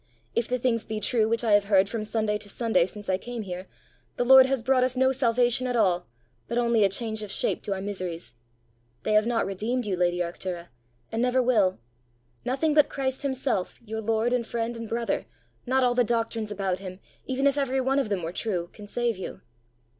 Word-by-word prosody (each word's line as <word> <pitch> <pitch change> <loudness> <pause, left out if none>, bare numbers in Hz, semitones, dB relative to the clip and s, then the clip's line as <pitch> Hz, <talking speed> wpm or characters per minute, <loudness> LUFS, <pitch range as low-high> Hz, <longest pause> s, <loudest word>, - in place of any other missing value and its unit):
If 235 - 0
the 250 - 0
things 235 -2 0
be 215 -1 -4
true 220 +1 +2
which 230 +1 +1
I 225 - +1
have 205 -1 +5
heard 195 -1 +4
from 220 +1 -3
Sunday 215 -1 -1
to 205 - -10
Sunday 200 -6 +1
since 205 +1 -9
I 185 0 +1
came 240 -1 -5
here, 185 -1 -6 0.5
the 245 - +1
Lord 265 +1 +9
has 265 -3 -1
brought 255 +1 +3
us 255 0 0
no 260 +1 +4
salvation 245 0 +2
at 250 - -1
all, 180 -6 +2 0.4
but 235 - -2
only 235 -2 +3
a 195 - +4
change 220 +2 -2
of 210 - -6
shape - - 0
to 200 - -2
our 190 - -5
miseries. 185 -7 -4 0.7
They - - 0
have 215 +1 +4
not 235 -1 +1
redeemed 220 +6 -2
you, 200 -3 -1
lady 175 0 +1
Arctura, 175 0 -4 0.4
and 225 - -1
never 250 +1 +2
will. 210 -7 +3 0.7
Nothing 275 +5 +1
but 300 -1 +5
Christ 265 -1 -2
himself, 260 -8 -1
your 220 0 -4
lord 225 +2 +1
and 240 -2 0
friend 235 0 -2
and 230 -1 -7
brother, 235 0 -1 0.4
not 260 +1 +3
all 245 -1 +3
the 245 0 +3
doctrines 230 -1 -1
about 195 -3 -2
him, 185 -1 -8 0.3
even 265 +1 0
if 280 -1 +4
every 270 -2 0
one 265 +2 +2
of 270 - -1
them 195 -4 -1
were 165 +1 -4
true, 180 -5 -2
can 210 -1 -11
save 235 -1 -1
you. 190 0 -7
225 Hz, 215 wpm, -26 LUFS, 200-250 Hz, 0.7 s, Lord